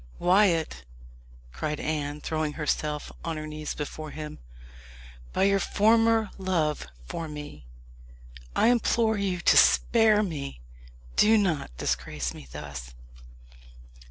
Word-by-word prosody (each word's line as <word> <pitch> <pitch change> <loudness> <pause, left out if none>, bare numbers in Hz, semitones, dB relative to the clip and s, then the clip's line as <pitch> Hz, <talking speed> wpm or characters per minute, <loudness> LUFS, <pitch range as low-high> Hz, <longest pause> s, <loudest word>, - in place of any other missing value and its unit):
"Wyat," 175 - +2 0.7
cried 150 - -3
Anne, 150 -1 -3
throwing 155 -1 -2
herself 150 -1 -2
on 165 -1 -3
her 155 - -5
knees 155 0 -5
before 155 +1 -6
him, 150 0 -7 0.9
"by - - +1
your 195 0 +4
former 225 +1 +3
love 165 - 0 0.2
for 165 - -5
me, 145 - -9 0.9
I - - +4
implore 230 -2 +2
you 185 -3 -1
to - - +5
spare 220 -2 +5
me! 145 - -5 0.6
Do 220 +1 +6
not 155 - -1
disgrace 65 -1 -2
me 65 - -11
thus." 70 -4 -8
155 Hz, 115 wpm, -27 LUFS, 145-200 Hz, 0.9 s, Do